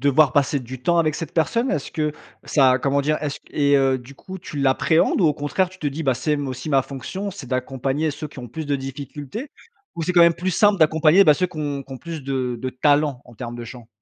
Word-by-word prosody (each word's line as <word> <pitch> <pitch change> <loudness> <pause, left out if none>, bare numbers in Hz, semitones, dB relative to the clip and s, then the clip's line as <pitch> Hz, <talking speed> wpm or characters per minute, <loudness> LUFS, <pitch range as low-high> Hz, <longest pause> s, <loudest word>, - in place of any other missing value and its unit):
devoir 140 0 +4
passer 140 0 +2
du 125 0 -9
temps 170 +2 +2
avec 155 -2 +2
cette 165 -2 -5
personne? 230 - +1
Est-ce - - -3
que 155 -2 0 0.3
ça, 130 -3 +3
comment 140 0 +1
dire, 155 +2 0
est-ce 145 -2 -3
et 145 -1 +3
heu, 135 -1 +3
du 130 +2 -12
coup, 190 - -9
tu 155 - -9
l'appréhendes 140 +7 +2
ou 170 - +5
au 150 - +4
contraire 160 +6 0
tu 185 0 -16
te 150 - -3
dis: 145 +3 -3
«Bah, 130 -3 +2
c'est 140 +5 -1
m 145 -1 0
c'est - - -3
aussi 130 +4 -6
ma 135 -1 +4
fonction, 190 +10 -5
c'est 170 -9 -9
d'accompagner 135 +4 -1
ceux 150 +2 -6
qui 140 -3 -11
ont 120 - -8
plus 155 +5 -6
de 145 - 0
difficultés.»? 140 - -6 0.5
Ou, 170 - -4
c'est 180 - 0
quand 175 - +5
même 170 -1 +6
plus 185 +2 -2
simple 205 +2 +3
d'accompagner 160 +4 +5
bah 150 - +6
ceux 180 - 0
qui 170 - -14
ont 145 -2 -3
qui 135 - -11
ont 130 - -7
plus 165 -3 -7
de 130 -3 -2
de 130 - -3
talent, 145 0 +2
en 120 - -15
termes 120 +1 -6
de 120 - -7
chant? 115 -1 -11
145 Hz, 260 wpm, -22 LUFS, 130-160 Hz, 0.5 s, même